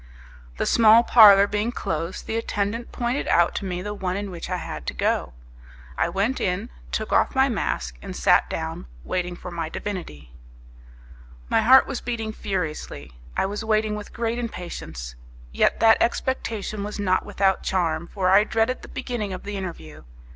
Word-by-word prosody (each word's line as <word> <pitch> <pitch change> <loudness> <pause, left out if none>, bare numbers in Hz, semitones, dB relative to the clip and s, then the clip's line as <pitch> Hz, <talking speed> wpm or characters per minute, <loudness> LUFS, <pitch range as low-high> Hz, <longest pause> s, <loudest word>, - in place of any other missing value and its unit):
The - - 0
small 225 0 +6
parlour 205 -5 +8
being 210 +3 -1
closed, 165 -5 -4
the 220 - -3
attendant 225 +1 -2
pointed 245 +3 -2
out 170 0 +3
to 200 - -4
me 180 -1 -3
the 205 +1 -4
one 185 -2 -3
in 200 -1 -4
which 175 -1 -7
I 180 - -1
had 115 - -7
to - - -3
go. - - 0 0.6
I - - +1
went 200 +9 0
in, 200 +6 -2 0.2
took 215 - -2
off - - +2
my 265 +1 +4
mask, 60 - -2
and - - -7
sat - - +3
down 65 - -5 0.2
waiting 180 - -2
for 180 - -9
my 165 -2 -4
divinity. 165 - -6 1.2
My - - +3
heart 260 +4 +7
was 250 - -5
beating 225 -3 -3
furiously; 160 - -4 0.3
I - - +2
was 205 +3 -4
waiting 215 -1 +1
with 210 -1 -8
great 230 +1 -2
impatience; 170 - -6 0.4
yet - - +2
that 225 0 +6
expectation 225 -4 -1
was 210 +1 -5
not 185 -2 +1
without 195 -1 +1
charm, 170 -3 -1
for 185 -2 +1
I 200 +2 +7
dreaded 225 +3 0
the - - -11
beginning 240 -6 -4
of 185 - -7
the 205 0 -5
interview. 120 - -7
200 Hz, 175 wpm, -24 LUFS, 180-225 Hz, 1.2 s, parlour